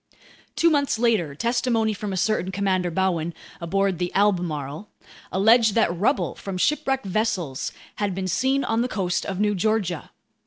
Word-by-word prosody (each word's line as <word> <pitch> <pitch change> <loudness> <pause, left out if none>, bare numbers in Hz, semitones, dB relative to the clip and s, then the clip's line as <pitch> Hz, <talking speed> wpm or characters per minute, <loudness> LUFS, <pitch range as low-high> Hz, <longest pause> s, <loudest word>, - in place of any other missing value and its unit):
Two 335 - +4
months 285 -5 +1
later, 215 -11 +1
testimony 235 - +1
from 205 0 -5
a 190 - -3
certain 190 -1 0
Commander 185 -2 0
Bowen, 170 -2 -1 0.3
aboard 195 +1 0
the 180 -1 -1
Albemarle, 175 -4 0 0.4
alleged 220 +3 +4
that 200 -7 +2
rubble 215 +11 +1
from 195 -2 -6
shipwrecked 270 +2 0
vessels 185 - -1 0.3
had 200 -3 -1
been 190 0 -3
seen 265 +9 +1
on 225 +1 0
the 245 - +1
coast 185 -7 -2
of 190 -1 -3
New 210 0 +2
Georgia. 195 -4 -1
195 Hz, 155 wpm, -24 LUFS, 180-225 Hz, 0.4 s, Two